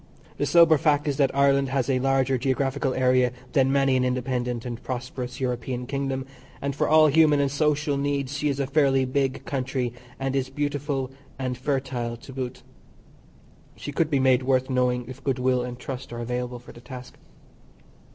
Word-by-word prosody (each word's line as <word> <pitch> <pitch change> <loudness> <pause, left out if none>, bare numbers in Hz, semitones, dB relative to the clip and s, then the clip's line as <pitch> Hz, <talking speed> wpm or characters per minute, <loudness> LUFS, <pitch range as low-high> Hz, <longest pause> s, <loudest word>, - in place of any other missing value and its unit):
The - - 0
sober 165 -3 +6
fact 145 +1 +2
is 140 -2 0
that 140 -2 +3
Ireland 140 -1 +3
has 135 -2 0
a 130 -2 +2
larger 135 0 +2
geographical 135 +1 0
area 125 -1 +3 0.2
than 135 -1 +3
many 135 -1 +3
an 130 - +2
independent 125 -1 -1
and 120 -1 -5
prosperous 125 0 -5
European 125 -1 -2
kingdom, 135 0 -2 0.3
and 140 -1 -3
for - - 0
all 155 0 +7
human 150 0 +5
and 140 -1 +1
social 150 0 +1
needs 140 0 -1
she 150 +1 0
is 140 -1 -2
a 140 - +1
fairly 135 -1 +3
big 135 0 -1
country, 130 -2 -2 0.3
and 135 0 -1
is 130 -1 0
beautiful 145 -1 -2 0.3
and 130 -1 -2
fertile 125 -3 -2
to 135 +3 -12
boot. 130 -1 -5 1.1
She 145 - -6
could 155 +2 +1
be 140 -3 +2
made 130 -1 +4
worth 130 0 +1
knowing 125 -1 +1
if 130 +1 -10
goodwill 130 -1 +1
and 125 0 -5
trust 125 -1 -7
are 120 - -5
available 125 +1 -3
for 120 - -13
the 120 - -14
task. 125 0 -10
130 Hz, 180 wpm, -25 LUFS, 125-140 Hz, 1.1 s, all